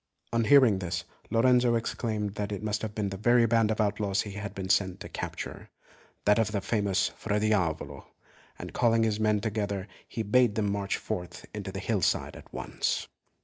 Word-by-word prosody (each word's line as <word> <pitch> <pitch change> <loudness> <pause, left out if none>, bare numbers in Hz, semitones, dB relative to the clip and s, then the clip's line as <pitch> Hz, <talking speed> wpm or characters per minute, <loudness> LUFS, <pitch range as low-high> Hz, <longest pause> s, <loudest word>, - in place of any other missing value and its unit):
On 115 -1 +2
hearing 130 -7 +6
this, 90 0 -3 0.3
Lorenzo 120 +1 +4
exclaimed 110 -3 -2
that 105 0 -3
it 100 0 -4
must 105 0 -1
have 110 -1 -5
been 105 -2 -1
the 95 - -5
very 120 +3 +4
band 115 -1 +3
of 110 - -1
outlaws 105 -1 +1
he 105 - -7
had 100 0 -6
been 95 -1 -4
sent 95 -1 +2
to - - -6
capture - - -6 0.6
that 105 +2 +5
of 110 -1 +1
the 105 - 0
famous 100 -1 +1
Fra 105 -1 -2
Diavolo 95 -7 -1 0.5
and - - -8
calling 115 -2 +3
his 110 -1 0
men 105 -1 +2
together, 100 -3 -2 0.2
he 115 - -3
bade 115 +1 +3
them 105 -2 +1
march 100 -1 -1
forth 90 0 -5
to 100 -2 -5
the 95 - -6
hillside 100 -2 0
at - - -13
once. - - -2
105 Hz, 190 wpm, -29 LUFS, 100-115 Hz, 0.6 s, hearing